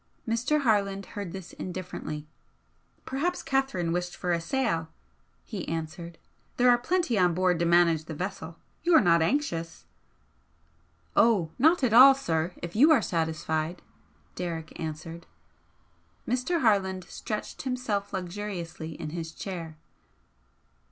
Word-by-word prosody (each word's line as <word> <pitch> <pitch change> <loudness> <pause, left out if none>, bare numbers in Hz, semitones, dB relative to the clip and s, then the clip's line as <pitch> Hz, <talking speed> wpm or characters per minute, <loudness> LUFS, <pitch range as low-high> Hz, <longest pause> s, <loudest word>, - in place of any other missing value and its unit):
Mr. 235 +7 +1
Harland 200 -5 +1
heard 200 -4 -5
this 190 -2 -8
indifferently. 180 -4 -6 0.8
"Perhaps 330 +7 -2
Catherine 270 -11 0
wished 175 +1 -2
for 180 - -2
a 170 -1 +1
sail," 165 -6 -1 0.5
he 65 - -6
answered. 165 +1 -5 0.4
"There 245 0 +6
are 240 - +5
plenty 315 - +1
on 180 -2 +3
board 180 -1 +2
to 170 - +1
manage 170 -2 +4
the 160 - -6
vessel. 165 -1 -5 0.2
You're 340 -1 +6
not 170 -3 +4
anxious?" 165 - -1 1.3
"Oh, 200 -9 +4
not 320 +3 +4
at 235 -4 +2
all, 265 +3 +10
sir, 165 -9 -1
if 175 +2 -6
you 290 +9 +6
are 270 -9 +5
satisfied," 160 0 -2 0.5
Derrick 165 -3 -5
answered. 165 +1 -6 1.0
Mr. 255 +8 0
Harland 190 -5 +2
stretched 210 +4 -5
himself 250 -6 -2
luxuriously 175 -4 -5
in 155 -3 -5
his 165 -1 -5
chair. 165 -3 -7
180 Hz, 125 wpm, -28 LUFS, 165-235 Hz, 1.3 s, all